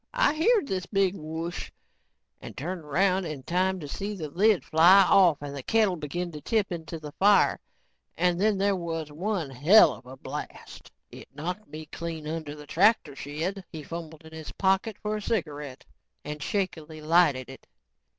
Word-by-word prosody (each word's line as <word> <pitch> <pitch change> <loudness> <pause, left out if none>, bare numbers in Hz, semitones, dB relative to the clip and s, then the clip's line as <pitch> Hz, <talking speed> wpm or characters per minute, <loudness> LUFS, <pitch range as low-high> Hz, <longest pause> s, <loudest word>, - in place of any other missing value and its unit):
I - - +3
heered 395 +5 +3
this 185 -4 -3
big 195 -2 +1
'whoosh' 160 +1 -5 0.7
and - - -10
turned 175 +5 -4
around 185 +5 +1
in 150 -5 -6
time 185 +3 0
to 145 - -6
see 205 +8 -4
the 155 -6 -6
lid 205 +3 +3
fly 175 +5 +7
off 180 -4 +5
and 140 -1 -6
the 140 - -5
kettle 215 - +2
begin 170 +3 -4
to 150 -2 -9
tip 215 0 0
into 165 -1 -6
the 150 -1 -8
fire 200 +6 +4 0.6
and 180 0 +1
then 210 -1 +3
there 200 0 +2
was 165 -4 -4
one 175 -2 -3
helluva 135 - +4
blast. - - -8 0.2
It - - -11
knocked 180 +8 -5
me 155 0 -8
clean 160 0 -6
under 155 -2 -5
the 150 0 -11
tractor 200 0 +2
shed." 165 +8 -4
He 155 -2 -7
fumbled 160 0 -8
in 160 - -13
his 160 -1 -8
pocket 190 +2 +1
for 215 0 -1
a - - -6
cigarette 150 - -4 0.4
and 150 0 -6
shakily 160 -4 -3
lighted 155 -5 +3
it. 135 +1 -13
170 Hz, 170 wpm, -27 LUFS, 150-195 Hz, 0.7 s, fly